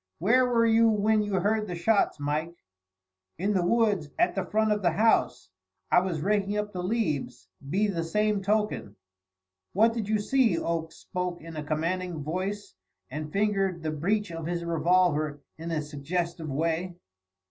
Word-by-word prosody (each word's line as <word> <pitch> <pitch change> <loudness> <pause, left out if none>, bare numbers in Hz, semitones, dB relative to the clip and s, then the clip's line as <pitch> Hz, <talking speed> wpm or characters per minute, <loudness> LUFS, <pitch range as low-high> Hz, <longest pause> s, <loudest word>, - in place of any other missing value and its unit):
"Where 250 +9 +3
were 235 -2 +3
you 225 0 +5
when 215 0 +2
you 205 -1 -3
heard 210 +3 +1
the 180 - -4
shots, 200 0 +2
Mike?" 155 +4 -2 0.8
"In 200 +4 0
the 185 -3 +1
woods 205 -6 +2
at 350 - +3
the - - -1
front 220 0 +1
of 210 0 +1
the 175 - +3
house. 225 +1 +2 0.4
I - - +7
was 180 -4 -2
raking 205 +2 0
up 210 0 -3
the 180 - -3
leaves, 180 - -2 0.2
be 195 +7 +2
the 180 -5 -1
same 210 +4 +1
token." 210 - -1 0.8
"What 225 +4 +4
did 220 -3 -3
you 215 - +3
see?" 225 -3 +2
Oakes 165 -1 -2
spoke 180 -2 -4
in 165 0 -9
a 150 - -4
commanding 165 +2 -2
voice 190 +6 -4 0.4
and 150 +2 -5
fingered 195 -3 0
the 155 - -1
breech 200 +6 -1
of 165 -1 -5
his 170 0 -2
revolver 165 -3 +2 0.2
in 165 +1 -5
a 160 -2 -1
suggestive 160 +3 -3
way. 165 +5 -1
185 Hz, 170 wpm, -27 LUFS, 165-210 Hz, 0.8 s, I